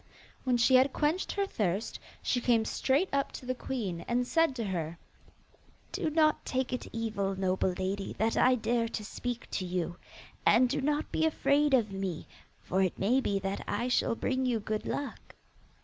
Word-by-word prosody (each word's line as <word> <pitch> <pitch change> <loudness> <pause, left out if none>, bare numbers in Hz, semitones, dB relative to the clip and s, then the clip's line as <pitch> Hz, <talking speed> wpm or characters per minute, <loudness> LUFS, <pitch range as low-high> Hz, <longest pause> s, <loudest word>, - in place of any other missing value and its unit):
When 250 -2 +3
she 235 +2 +4
had 260 +1 +5
quenched 315 +5 0
her 400 -1 0
thirst, 205 - -2 0.2
she 245 - +1
came 230 -2 +3
straight 280 +12 +1
up 275 0 +1
to - - -8
the 255 - 0
queen, 220 -10 -4
and 245 +1 +1
said 325 0 +2
to 235 - -2
her: 170 -5 -3 0.9
'Do - - -1
not 310 0 +3
take 260 -1 -1
it 250 - -3
evil, 215 -4 -2
noble 185 -1 0
lady, 195 +1 -2
that 220 +3 0
I 255 0 +5
dare 235 0 0
to 220 -2 -5
speak 245 +2 -5
to 190 - -1
you, 175 -1 -2 0.5
and 240 +4 +5
do 275 +3 -1
not 295 +2 0
be - - 0
afraid 290 -2 +3
of 220 -5 +1
me, 195 -4 -4 0.4
for 190 +2 0
it 185 -2 0
may 235 +7 +3
be 200 -5 0
that 195 +1 -3
I 235 +5 -1
shall 240 -1 +2
bring 260 +2 -1
you 245 -3 +1
good 215 +1 -3
luck. 285 -1 -5
235 Hz, 185 wpm, -30 LUFS, 195-265 Hz, 0.9 s, had